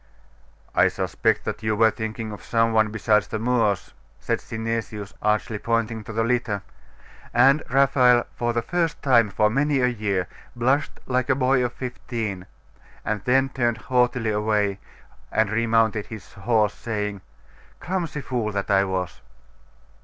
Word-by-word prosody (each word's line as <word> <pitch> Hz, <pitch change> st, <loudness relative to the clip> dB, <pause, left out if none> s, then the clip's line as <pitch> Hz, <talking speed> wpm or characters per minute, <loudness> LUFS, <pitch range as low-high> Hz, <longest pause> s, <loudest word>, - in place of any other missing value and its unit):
'I -, -, +5 dB
suspect -, -, 0 dB
that -, -, -4 dB
you 110 Hz, 0 st, 0 dB
were 110 Hz, +1 st, +4 dB
thinking 110 Hz, 0 st, -5 dB
of 105 Hz, -, -9 dB
some 115 Hz, -1 st, +1 dB
one 110 Hz, -1 st, +3 dB
besides 105 Hz, 0 st, +1 dB
the 110 Hz, -, -3 dB
Moors,' 115 Hz, -4 st, 0 dB, 0.3 s
said -, -, -1 dB
Synesius, 110 Hz, -2 st, -4 dB
archly 105 Hz, 0 st, 0 dB
pointing 115 Hz, -1 st, -1 dB
to 110 Hz, -, -8 dB
the 115 Hz, +1 st, 0 dB
litter; 115 Hz, -4 st, 0 dB, 0.7 s
and 135 Hz, +5 st, +5 dB
Raphael, 125 Hz, -2 st, +4 dB
for 120 Hz, 0 st, 0 dB
the 115 Hz, 0 st, -1 dB
first 170 Hz, -2 st, -1 dB
time 120 Hz, -6 st, +4 dB
for 105 Hz, +2 st, +2 dB
many 140 Hz, +3 st, +1 dB
a 125 Hz, -, +3 dB
year, 105 Hz, -7 st, -1 dB, 0.3 s
blushed 130 Hz, +5 st, 0 dB
like 125 Hz, 0 st, 0 dB
a 130 Hz, -, +4 dB
boy 130 Hz, -1 st, +2 dB
of 125 Hz, 0 st, -2 dB
fifteen, 115 Hz, -7 st, -5 dB, 0.6 s
and 105 Hz, -2 st, -2 dB
then 135 Hz, +2 st, +3 dB
turned 120 Hz, -4 st, 0 dB
haughtily 125 Hz, -1 st, +1 dB
away, 105 Hz, -2 st, 0 dB, 0.5 s
and 110 Hz, -2 st, +1 dB
remounted 110 Hz, -1 st, +1 dB
his 110 Hz, -4 st, -10 dB
horse, 105 Hz, -1 st, +1 dB
saying, 105 Hz, -3 st, -4 dB, 0.6 s
'Clumsy 175 Hz, -5 st, -3 dB
fool 120 Hz, -5 st, -2 dB
that 100 Hz, 0 st, -2 dB
I 95 Hz, 0 st, +5 dB
was! 95 Hz, -2 st, -3 dB
115 Hz, 150 wpm, -24 LUFS, 105-125 Hz, 0.7 s, I